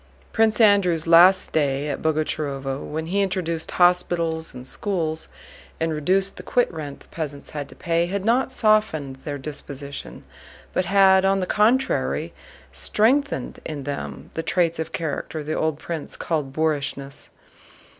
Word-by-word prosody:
Prince 220 -1 +3
Andrew's 200 -7 +4
last 175 +3 +7
stay 145 -2 0
at 145 - -3
Boguchárovo, 145 -3 -2
when 160 +2 -4
he 195 +5 0
introduced 175 -4 -2
hospitals 175 -2 +2
and 125 - -10
schools 160 -5 -2 0.5
and 165 0 0
reduced 190 +6 +1
the - - -6
quitrent 155 - -1
the - - -18
peasants 145 -3 -5
had 145 -2 -5
to - - -12
pay, 170 0 0
had 200 +1 -3
not 250 +4 +2
softened 215 - +1
their 145 +2 -5
disposition 140 0 -7 0.5
but 185 - +1
had 190 0 +5
on 195 0 +3
the 185 - -1
contrary 230 +8 +1 0.4
strengthened 275 +7 +1
in 145 -3 -5
them 140 0 -6
the 165 - -2
traits 170 0 +1
of 160 - -3
character 155 -1 -4
the 155 +1 -3
old 155 -2 0
prince 160 0 -6
called 150 -5 -2
boorishness. 140 -2 -2
165 Hz, 145 wpm, -23 LUFS, 150-190 Hz, 0.5 s, last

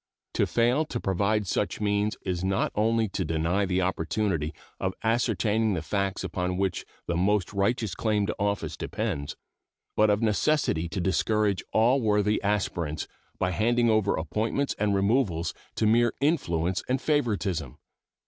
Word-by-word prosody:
To - - +2
fail 120 +6 +2
to 120 -5 -4
provide 100 +2 +1
such 100 +2 -1
means 105 0 0
is 90 -2 -2
not 95 0 +1
only 110 +1 +2
to 95 - -2
deny 85 +5 0
the 95 0 +1
opportunity 90 -2 -1 0.3
of 95 0 -2
ascertaining 110 -2 +1
the 80 - -3
facts 100 +3 -1
upon 90 0 -2
which 95 -2 -1 0.2
the 85 - -2
most 95 +2 +1
righteous 105 +2 0
claim 105 -2 0
to - - -2
office 100 0 -1
depends, 70 0 -3 0.6
but 110 0 +4
of 105 +2 +2
necessity 105 - +1
to 95 - -3
discourage 100 +2 +1
all 120 +5 +3
worthy 105 -1 +2
aspirants 90 -7 -1 0.3
by 90 - 0
handing 120 +4 +2
over 110 -2 +2
appointments 110 - -1
and 100 -1 +2
removals 100 - +1 0.2
to 110 - +1
mere 120 +2 +4
influence 95 - +1
and 130 +1 +1
favoritism. 110 - -1
100 Hz, 150 wpm, -27 LUFS, 90-110 Hz, 0.6 s, but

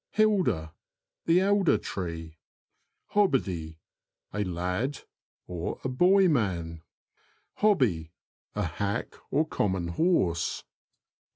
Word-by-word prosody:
HiLDER. 180 - +2 0.3
— - - -64
The 170 +2 +5
elder 200 -2 +3
tree. 80 -3 -6 0.7
HOBBIDY. 95 - +1 0.3
— - - -46
A 105 +1 0
lad, 90 +9 -2 0.5
a 90 +8 -4
boy 185 +9 +5
man. 90 - 0 0.8
Hobby. 120 - +2 0.2
— - - -48
A 105 - 0
hack 100 +4 -2 0.2
or 155 +3 +1
common 95 - -1
horse. 85 - +1
100 Hz, 100 wpm, -28 LUFS, -, 0.8 s, The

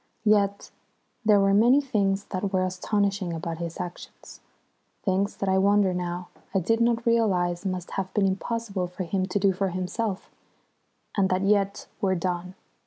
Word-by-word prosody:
Yet 200 -1 +2 0.5
there 210 -2 +5
were 195 0 +3
many 240 +7 +6
things 200 -7 0
that 190 +1 -2
were 185 -1 +2
astonishing 195 0 -1
about 165 0 -4
his 170 -1 -5
actions, 175 0 -8 0.6
things 195 +1 0
that 195 - -2
I 190 0 +3
wonder 200 -1 +3
now 180 0 -4 0.3
I - - +5
did 225 +6 +1
not 235 0 +2
realise 195 -6 +1
must 185 -2 -4
have 190 -1 -3
been 205 -2 +3
impossible 195 -1 -2
for 180 +2 -5
him 185 +2 -1
to 185 - -1
do 195 -1 +3
for 195 +1 -1
himself, 185 +3 -3 0.8
and 195 -2 +2
that 185 +1 +1
yet 200 0 +1 0.2
were 190 -2 +2
done. 180 +1 -3
195 Hz, 165 wpm, -26 LUFS, 180-205 Hz, 0.8 s, many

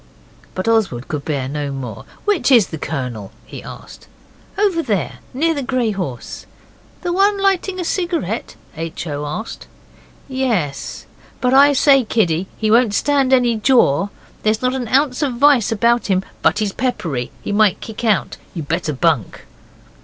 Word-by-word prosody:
But 185 - -3
Oswald 205 - +1
could 150 -2 -4
bear 140 -4 -2
no 145 0 -3
more. 125 -6 -6 0.2
'Which 405 -9 +2
is 235 -7 +6
the 160 - -6
Colonel?' 125 -10 -4
he - - -9
asked. - - -11 0.5
'Over 390 -5 +2
there 200 - -2
near 325 +6 +1
the 285 - -3
grey 255 -4 0
horse.' 170 - -6 0.6
'The 350 -1 -1
one 400 +2 +3
lighting 385 -1 +1
a - - -1
cigarette?' 330 - -2 0.2
H. 165 +1 -5
O. 145 -2 -4
asked. 215 +10 -6 0.6
'Yes 230 - -2 0.3
but 250 0 +1
I 285 +2 +7
say, 275 -1 +5
kiddie, 190 -6 0
he 215 -1 0
won't 230 -2 +4
stand 275 0 +2
any 245 -3 +3
jaw. 215 - +3 0.3
There's 215 +2 0
not 255 0 +2
an 255 -3 -3
ounce 260 +2 +2
of 280 -4 0
vice 255 -3 +4
about 235 +2 +2
him, 190 -2 +1 0.2
but - - +3
he's 210 -3 -1
peppery. 165 - -2
He - - -3
might 205 -2 +3
kick 220 +1 -8
out. 215 -4 +1 0.2
You'd 160 -4 -5
better 165 -1 -1
bunk. 140 - 0
220 Hz, 160 wpm, -19 LUFS, 160-265 Hz, 0.6 s, I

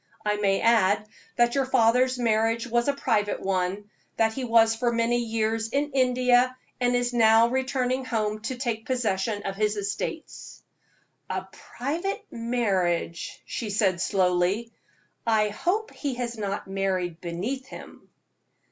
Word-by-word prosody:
I 210 0 +1
may 195 -1 +1
add 215 -2 +3 0.3
that 240 0 +3
your 275 -2 +1
father's 255 +1 +3
marriage 230 0 +1
was 240 +1 0
a 285 - +3
private 210 -6 0
one, 195 +2 -2 0.3
that 220 0 +2
he 265 - -4
was 225 -1 +4
for 240 +1 0
many 235 +1 +1
years 225 -1 -1
in 285 +4 -1
India, 255 -1 +3 0.2
and 245 0 +2
is 245 0 0
now 225 0 +5
returning 260 0 0
home 215 -3 -1
to 260 - -3
take 235 -3 -3
possession 215 -4 -1
of 195 - -3
his 210 +1 0
estates." 205 - -5 0.7
"A - - -3
private 345 - -4
marriage!" 195 -8 -1
she 225 - -4
said, 195 -4 +1
slowly. 185 +4 +1 0.6
"I 215 -2 +3
hope 385 - -1
he 280 -4 -3
has 240 -1 -3
not 200 -3 -4
married 190 -3 -2
beneath 215 +11 -4
him." - - -12
230 Hz, 140 wpm, -26 LUFS, 205-250 Hz, 0.7 s, now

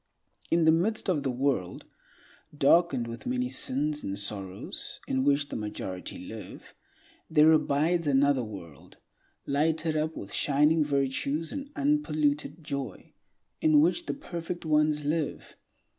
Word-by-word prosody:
In 165 -1 +3
the 160 - +7
midst 195 +6 +1
of 155 -5 0
the 135 - -1
world, 125 -8 -1 0.7
darkened 140 -3 +4
with 115 - -7
many 250 0 0
sins 150 - 0
and 100 0 -3
sorrows, 100 -2 -5
in 130 0 0
which 145 +1 +2
the - - -5
majority 100 -4 -5
live, - - -10 0.6
there 155 0 +6
abides 155 +2 +2
another 140 -1 +3
world, 90 -9 -11 0.5
lighted 160 +2 +1
up 155 +1 -1
with 100 - -8
shining 150 +2 +3
virtues 140 +2 -1
and 280 -1 -5
unpolluted 155 - 0
joy, 140 -2 -5 0.5
in 315 -2 +5
which 340 +2 +2
the - - -2
perfect 175 - -6
ones 150 -1 +2
live. 155 0 -2
150 Hz, 130 wpm, -28 LUFS, 135-165 Hz, 0.7 s, the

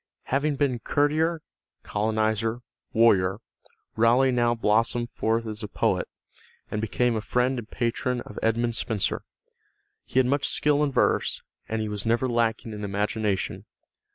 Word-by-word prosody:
Having 145 +2 +2
been 135 -4 0
courtier, 155 +5 +1 0.4
colonizer, 110 +2 0 0.3
warrior, 100 -5 +4 0.6
Raleigh 120 +4 +4
now 120 -1 +2
blossomed 115 +2 +1
forth 115 +1 0
as 110 0 -5
a 105 - -4
poet, - - 0 0.6
and 105 - -2
became 120 +2 +1
a 110 - -1
friend 125 +3 0
and 110 - -9
patron 120 +1 -1
of 105 - -8
Edmund 115 +1 +1
Spenser. 110 -2 -1 0.8
He - - -6
had 130 - +5
much 140 +3 +1
skill 150 0 +2
in 145 - +1
verse, - - +1 0.3
and 110 0 -1
he - - -3
was 105 -1 -4
never 115 +3 +1
lacking 115 -1 0
in 105 0 -6
imagination. 105 0 -1
115 Hz, 145 wpm, -26 LUFS, 110-125 Hz, 0.8 s, had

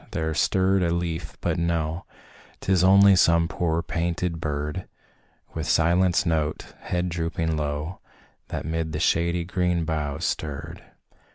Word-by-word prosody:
there 80 0 -1
stirred 95 +4 +2
a 85 - +1
leaf, 85 -1 -3
but - - 0
no, 85 -1 -1 0.5
Tis 95 -2 +2
only 100 +1 +7
some 85 -2 +4
poor, 85 -1 -1
panting 85 +1 -2
bird, 75 +3 -3 0.7
With - - -4
silenced 85 +2 +3
note, 80 -2 -1
head 90 0 -2
drooping 80 -1 -2
low, 75 +3 -3 0.5
That - - -5
'mid 80 0 -2
the 75 - -2
shady 85 +1 +1
green 90 -1 0
boughs 75 -3 -2
stirred. 80 +3 -4
85 Hz, 130 wpm, -25 LUFS, 80-90 Hz, 0.7 s, only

